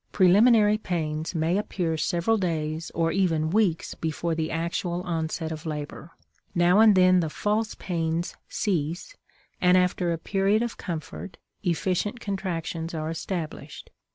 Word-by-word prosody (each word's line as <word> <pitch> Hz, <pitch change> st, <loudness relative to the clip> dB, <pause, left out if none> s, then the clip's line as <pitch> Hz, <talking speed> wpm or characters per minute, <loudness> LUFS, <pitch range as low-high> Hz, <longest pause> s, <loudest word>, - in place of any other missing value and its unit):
Preliminary 210 Hz, +3 st, +5 dB
pains 160 Hz, -3 st, -3 dB
may 165 Hz, +4 st, +1 dB
appear 175 Hz, -5 st, -2 dB
several 175 Hz, +7 st, +1 dB
days, 160 Hz, -3 st, -2 dB
or 165 Hz, 0 st, +1 dB
even 165 Hz, -5 st, +1 dB
weeks, 195 Hz, -5 st, +1 dB
before 165 Hz, +1 st, -2 dB
the 160 Hz, -1 st, -2 dB
actual 170 Hz, +1 st, -2 dB
onset 160 Hz, -1 st, -2 dB
of 155 Hz, -1 st, -6 dB
labor. 150 Hz, +1 st, -6 dB, 0.5 s
Now 175 Hz, +3 st, +4 dB
and 220 Hz, -2 st, +7 dB
then 185 Hz, 0 st, +5 dB
the 165 Hz, -3 st, 0 dB
"false" 215 Hz, +6 st, -1 dB
pains 165 Hz, -1 st, -2 dB
cease, 175 Hz, -, -2 dB, 0.5 s
and 180 Hz, 0 st, +5 dB
after 180 Hz, -1 st, +1 dB
a 165 Hz, -, -1 dB
period 195 Hz, +5 st, +1 dB
of 240 Hz, -, -3 dB
comfort 170 Hz, +2 st, -6 dB, 0.2 s
efficient 185 Hz, +5 st, -1 dB
contractions 170 Hz, -5 st, -3 dB
are 155 Hz, 0 st, -3 dB
established. 165 Hz, -1 st, -6 dB
175 Hz, 135 wpm, -26 LUFS, 160-195 Hz, 0.5 s, and